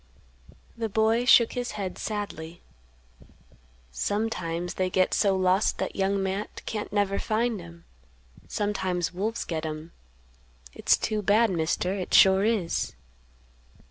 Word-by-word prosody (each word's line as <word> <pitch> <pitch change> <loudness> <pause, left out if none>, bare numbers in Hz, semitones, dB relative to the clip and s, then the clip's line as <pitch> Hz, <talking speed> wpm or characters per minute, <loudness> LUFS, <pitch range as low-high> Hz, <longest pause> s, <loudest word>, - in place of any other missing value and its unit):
The 230 -1 -3
boy 220 +3 +2
shook 235 -1 +6
his 245 -1 -3
head 195 -3 -5
sadly; 175 -6 -5 1.3
"Sometimes 175 - -2
they 185 -1 -1
get 185 0 +2
so 200 -2 +3
lost 185 +2 +2
that - - -3
Young 195 0 0
Matt 195 +2 -4
can't 210 -1 -4
never 200 -1 +1
find 225 -2 -1
'em; 170 0 -13 0.6
sometimes 190 -4 -1
wolves 215 +5 -2
get 160 -2 -3
'em; 155 +1 -6 0.8
it's - - +3
too 215 -1 -2
bad, 210 +2 +3
Mister, 170 +2 0
it 190 -2 -2
sure 190 0 +6
is." 210 -6 0
195 Hz, 125 wpm, -27 LUFS, 180-215 Hz, 1.3 s, shook